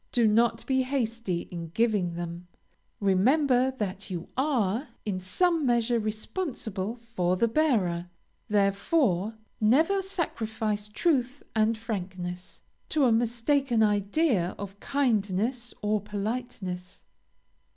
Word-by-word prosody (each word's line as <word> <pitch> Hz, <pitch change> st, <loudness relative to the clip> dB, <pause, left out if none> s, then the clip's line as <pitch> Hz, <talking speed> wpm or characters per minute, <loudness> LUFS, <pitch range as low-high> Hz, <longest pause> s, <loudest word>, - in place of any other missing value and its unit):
Do 235 Hz, -3 st, +4 dB
not 230 Hz, +2 st, +3 dB
be 265 Hz, -1 st, +2 dB
hasty 230 Hz, -8 st, -1 dB
in 170 Hz, -2 st, -5 dB
giving 205 Hz, -7 st, +1 dB
them; 175 Hz, +1 st, -6 dB, 0.5 s
remember 250 Hz, +7 st, +3 dB
that 195 Hz, -3 st, -4 dB
you 175 Hz, -2 st, -5 dB
are, 255 Hz, -3 st, +1 dB, 0.2 s
in 195 Hz, -3 st, -1 dB
some 330 Hz, -, +1 dB
measure 240 Hz, -2 st, +2 dB
responsible 215 Hz, -, -3 dB
for 205 Hz, -7 st, -1 dB
the 230 Hz, -, +3 dB
bearer; 205 Hz, -, +1 dB, 0.4 s
therefore, 200 Hz, -, +2 dB, 0.2 s
never 315 Hz, -, +4 dB
sacrifice 220 Hz, -, -2 dB
truth 260 Hz, +2 st, 0 dB
and 220 Hz, +1 st, +3 dB
frankness, 185 Hz, -5 st, -5 dB, 0.3 s
to 300 Hz, -3 st, +3 dB
a 245 Hz, -, +4 dB
mistaken 235 Hz, +2 st, +2 dB
idea 205 Hz, -, +2 dB
of 200 Hz, 0 st, -7 dB
kindness 235 Hz, -2 st, 0 dB
or 210 Hz, 0 st, +1 dB
politeness. 205 Hz, -3 st, -5 dB
220 Hz, 110 wpm, -28 LUFS, 195-255 Hz, 0.5 s, Do